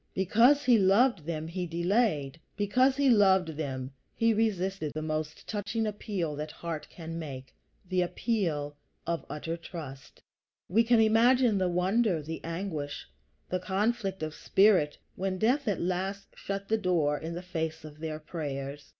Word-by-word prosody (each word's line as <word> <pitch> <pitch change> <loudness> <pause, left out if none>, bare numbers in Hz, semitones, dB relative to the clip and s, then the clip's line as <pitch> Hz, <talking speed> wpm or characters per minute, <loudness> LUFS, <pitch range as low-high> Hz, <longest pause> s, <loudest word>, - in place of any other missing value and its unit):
Because 230 +10 +4
he 240 -3 +6
loved 195 - +4
them, 160 -1 -3
he 175 +1 -3
delayed; 170 - 0 0.2
because 255 +7 +3
he 280 -1 +3
loved 190 -7 +5
them, 135 -4 -4 0.2
he 230 0 +3
resisted 195 -7 -1
that 155 - -2
most 155 -1 -4
touching 210 +2 -2
appeal 200 -7 -3
that 150 +1 -4
heart 165 -3 -5
can 165 -1 -7
make, 130 -5 -7 0.3
the 185 0 +1
appeal 175 -7 -1 0.3
of 170 0 -2
utter 160 +2 -4
trust. 155 -6 -9 0.5
We 220 +6 +4
can 235 0 +4
imagine 225 0 +4
the 185 -1 +1
wonder, 180 0 +1
the 160 +2 -6
anguish, 165 -4 -4 0.4
the 185 - -1
conflict 195 0 -1
of 155 -1 -3
spirit, 190 -7 +3 0.2
when 190 0 -2
death 250 +7 +1
at 200 -4 +1
last 190 +3 -2
shut 195 0 -5
the 220 0 +1
door 160 -6 +1
in 165 +1 -5
the 175 - -6
face 160 -3 -4
of 150 0 -11
their 155 -1 -4
prayers. 145 -3 -6
180 Hz, 155 wpm, -29 LUFS, 155-210 Hz, 0.5 s, he